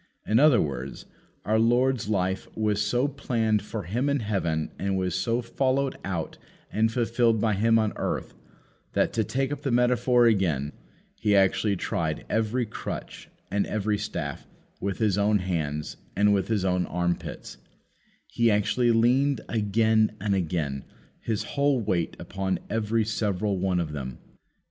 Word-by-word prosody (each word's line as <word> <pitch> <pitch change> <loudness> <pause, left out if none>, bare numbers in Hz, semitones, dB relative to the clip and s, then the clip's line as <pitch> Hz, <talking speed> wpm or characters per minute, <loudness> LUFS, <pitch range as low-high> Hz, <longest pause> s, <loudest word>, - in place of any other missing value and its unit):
In 110 +2 +3
other 145 -5 +6
words, 65 -2 -3 0.4
our 110 +2 +2
Lord's 120 0 +2
life 95 -2 0
was 105 -1 +1
so 120 +6 +1
planned 115 -6 0
for 105 +1 -5
Him 120 - -1
in 140 -2 +1
heaven 85 -7 -1
and 95 -1 0
was 90 -2 -1
so 115 +6 0
followed 130 +3 0
out 85 -4 -4 0.3
and 110 +1 +2
fulfilled 115 -1 +2
by 110 0 +2
Him 115 +3 +3
on 110 -2 +1
earth, - - -3 0.6
that, - - +1
to 110 - +1
take 135 +5 -1
up 145 -1 -4
the 140 - -2
metaphor 125 0 +3
again, 85 - +2 0.4
He 105 -2 +1
actually 100 +1 +3
tried 80 -3 -2
every 110 +3 +1
crutch 105 - -7 0.2
and 100 0 +1
every 105 -1 -1
staff 80 -9 -5 0.3
with 100 -1 -2
His 105 -3 +1
own 105 +1 +3
hands 80 -5 -3 0.2
and 105 +1 +4
with 100 -1 +1
His 105 -4 0
own 90 -1 +1
armpits; 85 0 -3 0.7
He 115 -1 +1
actually 110 +3 +2
leaned 125 +4 +3
again 110 0 +2
and 100 +1 0
again 80 -7 -1 0.4
His 110 -3 -2
own - - -10
whole 140 -2 +2
weight 95 -6 -1
upon 95 -1 -2
every 110 0 +1
several 105 -3 -1
one 90 -1 +1
of 80 -3 -2
them. 65 -4 -5
105 Hz, 155 wpm, -26 LUFS, 95-115 Hz, 0.7 s, other